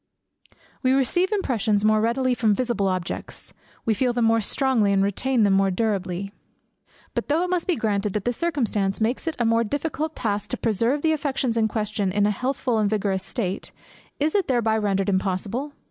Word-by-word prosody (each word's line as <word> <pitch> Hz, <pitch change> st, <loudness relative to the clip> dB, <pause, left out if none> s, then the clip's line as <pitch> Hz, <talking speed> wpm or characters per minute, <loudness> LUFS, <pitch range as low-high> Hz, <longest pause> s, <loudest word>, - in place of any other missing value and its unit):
We 255 Hz, -1 st, +3 dB
receive 350 Hz, -, +1 dB
impressions 220 Hz, -, +1 dB
more 215 Hz, 0 st, +4 dB
readily 250 Hz, +3 st, +1 dB
from 220 Hz, -4 st, +2 dB
visible 235 Hz, -5 st, 0 dB
objects, 185 Hz, -2 st, -4 dB, 0.3 s
we 225 Hz, -, +3 dB
feel 245 Hz, +3 st, +1 dB
them 240 Hz, -1 st, +1 dB
more 225 Hz, 0 st, +3 dB
strongly, 230 Hz, -2 st, +2 dB
and 195 Hz, 0 st, +3 dB
retain 235 Hz, +5 st, +1 dB
them 200 Hz, -1 st, +4 dB
more 195 Hz, 0 st, +3 dB
durably. 195 Hz, -1 st, -2 dB, 0.8 s
But -, -, -2 dB
though 315 Hz, +4 st, +2 dB
it 360 Hz, -, -2 dB
must 360 Hz, 0 st, 0 dB
be 360 Hz, -, +2 dB
granted 210 Hz, -4 st, -1 dB
that 210 Hz, -, -2 dB
this 245 Hz, 0 st, 0 dB
circumstance 220 Hz, -12 st, -1 dB
makes 235 Hz, +8 st, -1 dB
it 325 Hz, -, -1 dB
a 240 Hz, -, 0 dB
more 230 Hz, +1 st, +3 dB
difficult 300 Hz, +5 st, -3 dB
task 205 Hz, -3 st, -2 dB
to -, -, -2 dB
preserve 230 Hz, +6 st, 0 dB
the 320 Hz, -, +3 dB
affections 270 Hz, -5 st, -1 dB
in 225 Hz, -1 st, +2 dB
question 210 Hz, -3 st, -1 dB
in 205 Hz, +2 st, +2 dB
a 210 Hz, -, +3 dB
healthful 250 Hz, +1 st, -1 dB
and 210 Hz, -1 st, +2 dB
vigorous 200 Hz, -3 st, 0 dB
state; 195 Hz, -1 st, -3 dB, 0.5 s
is 300 Hz, +2 st, +1 dB
it 400 Hz, -2 st, +1 dB
thereby 235 Hz, -4 st, +2 dB
rendered 195 Hz, -3 st, 0 dB
impossible? 200 Hz, +8 st, -1 dB
225 Hz, 190 wpm, -24 LUFS, 200-260 Hz, 0.8 s, more